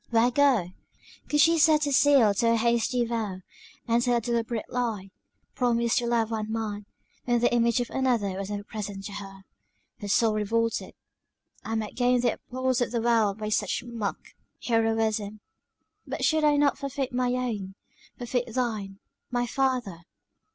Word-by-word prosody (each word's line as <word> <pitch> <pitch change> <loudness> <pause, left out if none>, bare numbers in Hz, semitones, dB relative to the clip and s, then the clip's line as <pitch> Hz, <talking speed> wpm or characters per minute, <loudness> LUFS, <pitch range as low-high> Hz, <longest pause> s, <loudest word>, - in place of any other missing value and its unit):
where 235 +1 +3
go? 250 -10 +3 0.6
Could 295 0 +3
she 330 +1 +4
set 305 -1 +4
a 285 - -1
seal 270 -6 +5
to 230 +3 +2
a - - +3
hasty 235 +1 +1
vow, 220 -5 -3 0.5
and 235 +1 +2
tell 245 -1 +2
a - - +2
deliberate 235 -1 -2
lie; 220 -6 -3 0.4
promise 235 -2 +1
to 240 - 0
love 230 -1 +1
one 215 -1 -3
man, 210 -2 -4 0.4
when 240 -1 +2
the 240 +1 +2
image 235 0 +3
of 245 - -3
another 235 -8 0
was 195 +1 -5
ever 205 -1 -4
present 205 -2 -6
to - - -6
her 195 -1 -9 0.6
her 205 - -6
soul 220 +2 +3
revolted. 225 +2 -1 0.7
"I 225 - -3
might 215 -1 -3
gain 250 0 +2
the 240 -2 +2
applause 255 0 -2
of 245 - +1
the 235 0 -1
world 225 -3 +2
by 215 -1 -4
such 210 0 0
mock 230 -4 -4 0.5
heroism; 225 -2 0 0.7
but - - -2
should 315 -1 +2
I 295 -1 +4
not 285 -1 +2
forfeit 275 -2 -3
my 250 0 +1
own? 215 -7 -3 0.4
forfeit 245 0 -2
thine, 215 -6 -2 0.3
my 245 -1 0
father!" 250 -8 -1
235 Hz, 165 wpm, -27 LUFS, 215-250 Hz, 0.7 s, seal